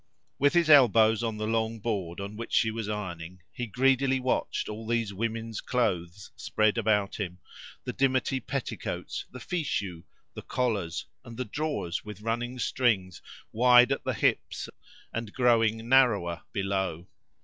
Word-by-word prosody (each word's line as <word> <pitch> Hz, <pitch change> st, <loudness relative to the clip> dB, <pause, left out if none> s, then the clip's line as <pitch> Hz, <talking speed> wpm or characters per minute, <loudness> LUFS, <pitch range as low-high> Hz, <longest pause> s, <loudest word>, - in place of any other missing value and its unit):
With 145 Hz, +1 st, +4 dB
his 170 Hz, -2 st, +4 dB
elbows 115 Hz, -7 st, +6 dB
on 115 Hz, -2 st, -2 dB
the 110 Hz, -, -2 dB
long 110 Hz, 0 st, -1 dB
board 100 Hz, -6 st, -3 dB
on 100 Hz, +1 st, -6 dB
which 115 Hz, +2 st, -7 dB
she 110 Hz, -, +3 dB
was 110 Hz, -1 st, -4 dB
ironing, 90 Hz, -4 st, -6 dB
he 125 Hz, -, -5 dB
greedily 135 Hz, +3 st, +2 dB
watched 130 Hz, 0 st, -1 dB
all 110 Hz, +1 st, -7 dB
these 115 Hz, -3 st, 0 dB
women's 115 Hz, +1 st, -3 dB
clothes 100 Hz, -6 st, -2 dB
spread 110 Hz, -5 st, +1 dB
about 105 Hz, -3 st, +1 dB
him, 90 Hz, -3 st, -4 dB, 0.5 s
the -, -, -4 dB
dimity 130 Hz, 0 st, +1 dB
petticoats, 135 Hz, -1 st, -4 dB
the 130 Hz, -, -9 dB
fichus, 110 Hz, -, -3 dB, 0.3 s
the -, -, -7 dB
collars, 105 Hz, -10 st, -2 dB, 0.2 s
and 120 Hz, -2 st, -11 dB
the 130 Hz, -, -2 dB
drawers 145 Hz, -, -3 dB
with 105 Hz, -1 st, -9 dB
running 120 Hz, +3 st, -2 dB
strings, 100 Hz, -, 0 dB, 0.3 s
wide 125 Hz, +2 st, +6 dB
at 135 Hz, -, -1 dB
the -, -, -1 dB
hips -, -, 0 dB, 0.4 s
and 115 Hz, -2 st, -4 dB
growing 115 Hz, -3 st, +2 dB
narrower 115 Hz, -10 st, +3 dB
below. 95 Hz, -3 st, -2 dB
115 Hz, 150 wpm, -28 LUFS, 100-125 Hz, 0.5 s, elbows